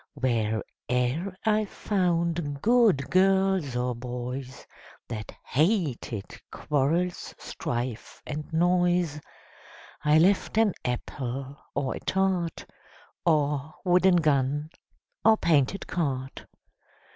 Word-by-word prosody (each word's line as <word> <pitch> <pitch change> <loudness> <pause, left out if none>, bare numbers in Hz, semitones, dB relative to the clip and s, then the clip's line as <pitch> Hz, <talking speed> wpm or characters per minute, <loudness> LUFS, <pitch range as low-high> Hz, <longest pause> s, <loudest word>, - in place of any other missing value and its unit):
Where 115 -5 0 0.3
e'er 130 +10 0
I 215 0 +3
found 170 -7 -1
good 220 - +4
girls 190 -6 +3
or 125 0 0
boys, 125 +2 -6 0.4
That 105 -3 -5
hated 145 - -1
quarrels, 160 +5 -1
strife 120 -1 -4
and 150 +1 -6
noise, 175 -2 +2 0.8
I 150 +1 +5
left 190 +5 +3
an 220 -4 +4
apple, 130 +2 -4 0.2
or 135 - -1
a - - -6
tart, 185 -3 0 0.6
Or 150 -2 +1
wooden 180 +1 +5
gun, 145 -1 +1 0.5
or 220 +1 +6
painted 160 +2 +2
cart. 135 -6 -3
150 Hz, 95 wpm, -27 LUFS, 130-180 Hz, 0.8 s, or